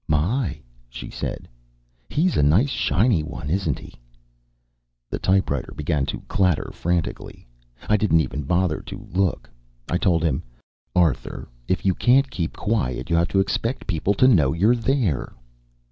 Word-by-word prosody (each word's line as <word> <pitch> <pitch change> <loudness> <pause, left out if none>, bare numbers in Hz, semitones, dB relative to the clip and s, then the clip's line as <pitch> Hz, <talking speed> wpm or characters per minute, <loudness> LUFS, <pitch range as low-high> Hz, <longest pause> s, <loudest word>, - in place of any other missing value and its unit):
"My," 80 - 0 0.3
she - - -8
said, - - -5 0.6
"he's 175 +4 +1
a - - +3
nice 90 - +4
shiny 100 - +2
one, 75 -1 -6
isn't 85 -6 0
he?" - - -12 1.2
The - - -2
typewriter 95 -8 0
began 75 -2 -1
to - - -4
clatter 90 -5 0
frantically. 85 -1 -3 0.4
I 105 - +4
didn't 95 -6 +3
even 70 0 -3
bother 85 +2 0
to 95 +3 -9
look; 95 -2 0 0.4
I 90 - +1
told 85 -5 +2
him: 80 - +1 0.5
"Arthur, 85 -6 0 0.2
if 95 - -1
you 95 - +4
can't 130 +6 +3
keep 85 -3 -3
quiet, 75 - -1
you - - +4
have 85 +1 +3
to 95 - +1
expect 115 +6 -1
people 95 +2 0
to 130 - +5
know 75 - +4
you're 105 +9 +3
there." 115 - 0
90 Hz, 150 wpm, -23 LUFS, 75-105 Hz, 1.2 s, to